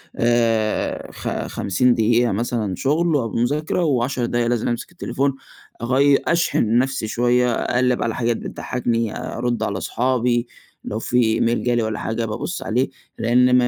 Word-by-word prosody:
آآ 115 -2 +1
خ - - -8 0.2
خمسين 120 +6 +1
دقيقة 115 +1 +2
مثلًا 110 -2 -1
شغل 155 - +1
أو 115 -6 0
مذاكرة، 150 +8 0
وعشر 130 -3 0
دقايق 120 0 0
لازم 120 -2 0
أمسك 120 +6 -3
التليفون 140 -5 -1 0.5
أغيّ 135 +3 +4
أشحن 120 -9 +2
نفسي 130 -3 0
شوية، 120 +2 +2
أقلّب 125 +2 +1
على 115 -1 -1
حاجات 115 -1 0
بتضحكني، 115 -3 -2
أرُد 120 -1 -2
على 100 -3 -2
صُحابي، 120 0 0 0.4
لو 110 - -4
في 125 - -1
إيميل 115 +1 +1
جا 120 -1 +1
لي 120 - +1
والّا 110 -1 -2
حاجة 115 +1 -2
بابص 110 +10 -4
عليه 125 +4 0 0.3
لأن 125 +2 +4
ما 120 -1 +3
120 Hz, 155 wpm, -21 LUFS, 115-125 Hz, 0.5 s, أغيّ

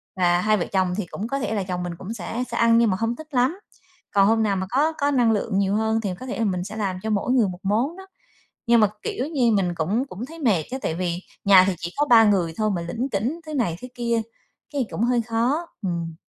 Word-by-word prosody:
và 175 -1 +3
hai 215 +2 +3
vợ 175 - -1
chồng 185 -2 +2
thì 210 - -2
cũng 200 +5 -5
có 275 +3 -2
thể 220 -4 -2
là 205 -3 -1
chồng 180 -1 -3
mình 175 -1 -4
cũng 195 +6 -6
sẽ 230 +3 -4
sẽ - - -2
ăn 230 0 +5
nhưng 230 -1 +4
mà 185 - 0
không 225 +3 -1
thích 315 +4 -11
lắm. 260 +9 +1 0.5
Còn 195 -1 +5
hôm 225 +1 +3
nào 205 -2 +1
mà 190 0 -2
có 285 +7 +2
có 285 -2 0
năng 245 -4 +3
lượng 205 -1 0
nhiều 200 0 +1
hơn 220 +1 +1
thì 205 - -2
có - - -7
thể 255 - -5
là 225 - +1
mình 180 -3 -1
sẽ 200 +4 -7
làm 195 -4 -2
cho 220 - -2
mỗi 210 +3 0
người 245 -5 +4
một 180 -1 -6
món 235 - 0
đó. 380 0 -11 0.6
Nhưng 235 0 +5
mà, 215 - +5 0.2
kiểu 255 - -2
như, 265 -7 +2
mình 185 -4 +1
cũng 195 +11 0
cũng 220 0 -6
thấy 325 +4 -11
mệt 210 - +2
á, 260 - -2
tại 160 - -2
vì 175 0 -2 0.3
nhà 195 -2 +8
thì 195 - +1
chỉ 170 +2 -5
có 295 - +3
3 235 -5 +7
người 190 -6 +2
thôi 215 -1 +1
mà 170 - -2
lỉnh 230 +11 -3
kỉnh 240 +9 -2
thứ 310 - -7
này 230 - 0
thứ 250 - -7
kia, 235 -1 0 0.5
cái, 275 -3 0
cũng 220 - -2
hơi 240 0 +2
khó, 240 +9 0
ừm. 170 -4 -3
220 Hz, 275 wpm, -23 LUFS, 190-245 Hz, 0.6 s, nhà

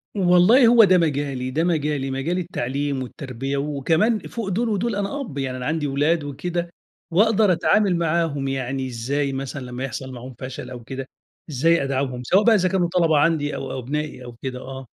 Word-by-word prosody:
،والله 190 +7 +5
هو 235 -1 +7
ده 185 -2 +5
مجالي، 140 -5 -1
ده 160 +5 0
مجالي 150 -5 0
مجال 150 +7 -1
التعليم 140 -5 -2
والتربية، 135 +2 -5
وكمان 160 - +1
فوق 225 -5 -5
دول 225 +5 0
ودول 210 +1 -1
أنا 205 +8 -2
أب، 170 - -7
يعني 130 -2 -2
أنا 125 - -5
عندي 155 -1 -1
اولاد 145 +3 +1
وكده 170 +5 -3 0.4
وأقدر 210 +1 +4
اتعامل 195 +1 +3
معاهم، 165 -4 0
يعني 135 0 -2
إزاي 135 +4 -2
مثلًا 135 0 -5
لمّا 125 +1 -6
يحصل 130 +1 -5
معاهم 125 +1 -9
فشل 130 -1 -7
أو 120 -2 -9
كده، 135 +2 -6 0.4
إزاي 160 +3 +2
أدعمهم 130 -2 -2
سواء 190 - +3
بقى 225 0 +5
إذا 185 -2 +2
كانوا 175 -2 +1
طلبة 165 -4 +3
عندي 150 -1 +2
أو 135 - -5
أو 130 - -4
أبنائي 145 +1 -4
أو 120 -1 -10
كده، 130 -1 -4
آه. 130 -1 -8
145 Hz, 185 wpm, -22 LUFS, 135-180 Hz, 0.4 s, هو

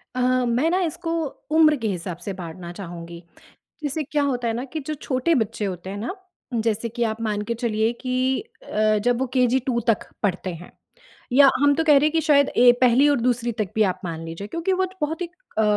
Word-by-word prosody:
अ, - - -2 0.3
मैं 245 +7 +1
ना 360 +2 +2
इसको 330 -1 -3 0.5
उम्र 310 -2 +6
के 230 -4 -2
हिसाब 180 -3 -4
से 200 - -3
बाँटना 175 -1 -8
चाहूँगी। 170 -2 -8 0.6
जैसे 295 +2 -1
क्या 290 +1 -1
होता 250 -4 -1
है 225 - 0
ना 240 +2 -3
कि 315 - -2
जो 310 - -1
छोटे 280 +1 0
बच्चे 220 -2 -1
होते 185 -1 -5
हैं 200 - -5
ना, 235 - -4 0.4
जैसे 225 0 0
कि 235 +1 -2
आप 220 0 -2
मान 210 -2 -1
के - - +2
चलिए 225 -1 0
कि 255 0 0 0.2
अ, 215 - +1
जब 240 +3 +1
वो 265 - 0
केजी 255 0 +3
टू 240 -2 +1
तक 225 -3 +1 0.2
पढ़ते 185 -2 -1
हैं, 170 +2 -11 0.6
या 275 +1 +8
हम 285 0 +5
तो 325 - +1
कह 300 -3 +6
रहे 285 - +3
हैं 305 - +2
कि 325 +1 +1
शायद 285 -3 +4
ए 245 0 +8
पहली 255 +3 +5
और 285 - +2
दूसरी 240 0 +1
तक 210 -3 0
भी 220 - +2
आप - - -11
मान 165 -1 -5
लीजिए, 165 +5 -7
क्योंकि 335 - -1
वो 375 0 +1 0.2
बहुत 315 +3 -2
ही 355 - -1 0.3
अ, 220 - +4
240 Hz, 225 wpm, -23 LUFS, 205-285 Hz, 0.6 s, या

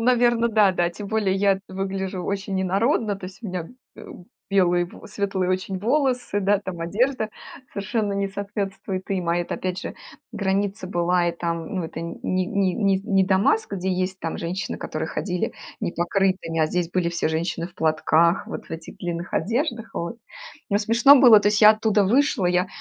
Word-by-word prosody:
наверно, 240 -1 +3
да-да. 195 -5 +3
Тем 205 +3 -8
более 205 -3 +1
я 195 0 +2
выгляжу 190 0 -3
очень 195 0 -2
инородно. 205 +3 +1
То 190 -1 -8
есть 195 +5 -13
у - - -5
меня 180 -2 -3
б - - -13 0.3
э, - - -11 0.5
белые, 180 -3 +3
в 190 +6 -12
светлые 195 -3 -1
очень 185 +1 -2
волосы, 250 -2 0
да. 200 +1 +3
Там 190 -4 -6
одежда 220 +6 0 0.4
совершенно 205 +1 -2
не 200 0 -1
соответствует 195 -1 -4
им, 185 -3 -1
а 170 - +2
это, 175 - -3
опять 185 0 -3
же, - - -6 0.4
граница 200 -2 -1
была, 175 -1 +1
и - - -1
там, 170 +1 -4
ну, 175 - -1
это - - -6
ни 170 0 -5 0.3
ни 190 0 0
ни 195 -4 +2
с 195 - -13
не 195 -3 +3
Дамаск, 200 - +2
где 190 0 -2
есть 185 +1 -1
там 165 - -3
женщины, 175 +3 -4
которые - - -4
ходили 180 -3 -2 0.3
непокрытыми, 175 -1 0
а 155 - +4
здесь 175 +1 -2
были 180 -2 0
все 170 -2 -1
женщины 165 +1 -2
в 175 - -17
платках, 160 +2 +2
вот - - -7
в - - -21
этих 160 0 -8
длинных 175 -1 -4
одеждах, 235 - -1
вот. 170 +7 -4 0.5
Но 200 - +3
смешно 235 +6 +6
было, 240 -5 +8
то 205 - +3
есть 210 +1 +1
я 215 - +11
оттуда 215 -2 +2
вышла, 240 -2 +2
я 180 +1 +2
195 Hz, 185 wpm, -23 LUFS, 180-210 Hz, 0.5 s, я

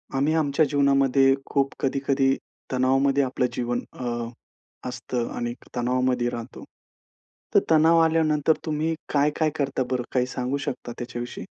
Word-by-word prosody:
आम्ही 140 +4 +2
आमच्या 155 -1 +2
जीवनामध्ये 135 -1 +4
खूप 140 -1 0
कधी-कधी 135 0 +1 0.4
तणावामध्ये 135 +2 +2
आपलं 130 -1 0
जीवन 120 0 -1 0.2
अ, 125 - -4 0.8
असतं 125 -1 -3
आणि 120 0 -2 0.2
तणावामध्ये 125 0 +1
राहतो. 120 0 -7 0.9
तर - - +7
तणाव 160 +1 +5
आल्यानंतर 160 -1 +3
तुम्ही 155 +1 -1 0.2
काय-काय 150 +2 +2
करता 135 -3 -1
बरं? 125 -1 0
काही 125 -1 +2
सांगू 125 +2 -2
शकता 120 - -5
त्याच्याविषयी? 120 0 -6
135 Hz, 125 wpm, -25 LUFS, 125-145 Hz, 0.9 s, तर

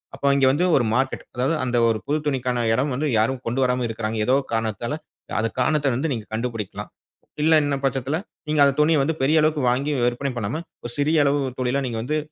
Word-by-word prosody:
அப்போ 140 +1 -2
இங்க 135 -1 +3
வந்து 145 +6 +1
ஒரு 120 - +3
மார்க்கெட், 130 +2 0
அதாவது 130 +6 +1
அந்த 125 -1 0
ஒரு 115 - +2
புது 150 +2 +1
துணிக்கான 125 -3 0
இடம் 135 +5 0
வந்து 150 +4 -1
யாரும் 125 +4 +1
கொண்டு 120 +3 -1
வராம 125 0 +1
இருக்கிறாங்க, 110 0 -3
ஏதோ 130 - +4 0.2
காரணத்தால. 115 +4 -1 0.4
அந்த 115 +1 0
காரணத்தை 150 -3 +2
வந்து 140 +4 -1
நீங்க 110 -4 -5
கண்டுபிடிக்கலாம். 115 -3 -4 0.5
இல்ல 160 - +3
என்னும் 140 -1 -2
பட்சத்தில, 135 +3 -1 0.3
நீங்க 155 - +1
அந்த 140 - +3
துணியை 155 -1 +4
வந்து 160 +3 -1
பெரிய 155 +3 +4
அளவுக்கு 155 -1 +1
வாங்கி 135 +4 0
விற்பனை 125 +3 -1
பண்ணாம, 120 +9 -2 0.2
ஒரு 120 - -5
சிறிய 150 +3 +2
அளவு 140 +1 +2 0.2
தொழிலா 130 +3 0
நீங்க 115 -2 -3
வந்து 150 +5 -1
130 Hz, 200 wpm, -23 LUFS, 120-145 Hz, 0.5 s, ஏதோ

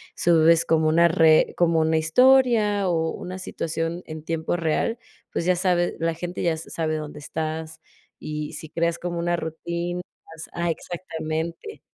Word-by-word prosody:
subes 165 -1 +4
como 160 -1 +2
una 170 +2 +5
re 160 -1 +4
como 170 -2 +3
una 160 0 +2
historia 215 +2 +4
o 165 -1 0
una 185 +1 -7
situación 165 0 -3
en 155 -1 -8
tiempo 165 +1 -2
real, 170 +8 0 0.3
pues 170 - -2
ya 185 0 +3
sabe, 175 -1 +1
la 165 0 0
gente 175 +2 -5
ya 170 -2 +2
s 160 - -8
sabe 155 -1 -1
dónde 150 -1 -7
estás, 160 +1 -5 0.4
y 150 0 -5
si 160 - -8
creas 170 0 -1
como 175 -1 -3
una 175 0 +1
rutina 170 +2 -4 0.5
ah, 170 0 -1
exactamente. 165 - -5
165 Hz, 155 wpm, -24 LUFS, 160-175 Hz, 0.5 s, una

